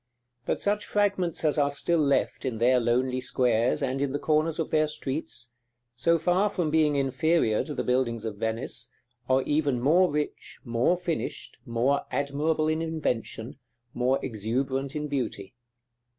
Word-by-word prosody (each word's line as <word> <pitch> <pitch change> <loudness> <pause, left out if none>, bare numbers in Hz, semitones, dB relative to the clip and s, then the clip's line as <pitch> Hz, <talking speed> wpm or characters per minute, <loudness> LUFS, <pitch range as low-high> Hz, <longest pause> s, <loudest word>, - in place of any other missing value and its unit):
But - - 0
such 210 +1 0
fragments 190 -6 0
as 150 0 +2
are 140 -1 +3
still 165 +4 0
left 140 -2 +1
in 125 -4 -2
their 125 +3 +4
lonely 125 +2 +1
squares, 125 +2 +1
and 135 0 -1
in 140 -1 -1
the - - +1
corners 155 +1 +1
of 165 - -2
their 155 0 +3
streets, 140 -4 -4 0.4
so 170 +7 +2
far 180 +5 +2
from 170 -5 -1
being 155 -2 +3
inferior 135 -3 +2
to 150 - -6
the 125 - -1
buildings 120 -3 0
of 110 -2 -4
Venice, 110 +2 -2 0.4
are 130 0 +3
even 145 -4 +1
more 170 +8 +4
rich, 150 0 -4
more 120 +9 +2
finished, 175 -2 -4
more 120 +5 +1
admirable 150 +2 0
in 155 +1 0
invention, 135 -6 -3 0.3
more 125 +2 +2
exuberant 130 +5 -2
in 150 0 -2
beauty. 120 -8 -3
140 Hz, 155 wpm, -27 LUFS, 125-155 Hz, 0.4 s, their